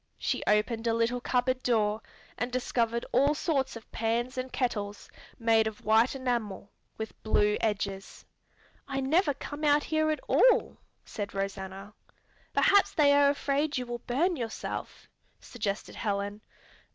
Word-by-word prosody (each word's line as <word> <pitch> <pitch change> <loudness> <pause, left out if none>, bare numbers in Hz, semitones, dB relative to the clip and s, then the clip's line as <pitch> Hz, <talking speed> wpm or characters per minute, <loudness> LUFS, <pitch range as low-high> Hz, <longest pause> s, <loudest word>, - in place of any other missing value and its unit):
She - - -1
opened 225 +2 +1
a 225 - +2
little 235 +2 0
cupboard 255 +1 0
door 215 -3 +1 0.3
and 245 +1 -3
discovered 235 -2 0
all 280 +4 +3
sorts 270 -4 -1
of 230 - -11
pans 235 +3 -1
and 255 0 -4
kettles 205 -5 -3 0.3
made 225 -1 +3
of 220 -1 -7
white 220 +5 +4
enamel 235 -7 -3 0.3
with 220 0 -7
blue 210 -1 +2
edges. 200 -3 -3 0.6
"I 270 -1 -2
never 290 +2 +2
come 290 +2 -7
out 295 0 +4
here 310 0 +1
at 310 - 0
all," - - +3 0.3
said 205 -1 -6
Rosanna. 195 0 -5 0.6
"Perhaps 405 0 +4
they 285 -2 +5
are 285 0 +5
afraid 285 +1 0
you 250 - -2
will 240 0 -5
burn 315 +10 0
yourself," 230 -6 -5 0.3
suggested 210 -4 -4
Helen. 205 0 -3
240 Hz, 140 wpm, -29 LUFS, 210-275 Hz, 0.6 s, they